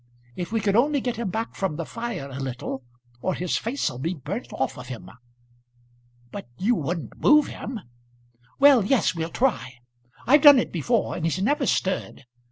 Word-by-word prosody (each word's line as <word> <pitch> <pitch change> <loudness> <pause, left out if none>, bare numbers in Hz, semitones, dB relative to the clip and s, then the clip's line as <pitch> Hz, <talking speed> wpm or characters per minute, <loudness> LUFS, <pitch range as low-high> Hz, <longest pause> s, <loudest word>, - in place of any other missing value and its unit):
If 175 +2 -5
we 225 -1 0
could 200 -1 +1
only 285 +5 +3
get 245 -2 -3
him 230 -4 -2
back 225 +5 -3
from 190 -6 -2
the 165 +1 -4
fire 230 -10 -5
a 135 - -6
little, 130 0 -5 0.4
or 185 - -1
his 180 -1 -2
face'll 230 - -2
be 165 +7 -2
burnt 170 - -6
off 135 - -2
of 125 -1 -9
him." 125 -3 -8 1.2
"But - - -7
you 220 +6 +2
wouldn't 170 - -4
move 300 -1 +6
him?" 230 -1 -6 0.8
"Well, 280 -5 +6
yes; 225 -1 +2
we'll 165 -1 -3
try. 130 - -1 0.5
I've 290 +4 +5
done 290 -2 +9
it 245 - 0
before, 215 - 0
and 170 - -5
he's 165 +2 0
never 275 +7 +1
stirred. 185 -7 -1
195 Hz, 175 wpm, -24 LUFS, 160-245 Hz, 1.2 s, done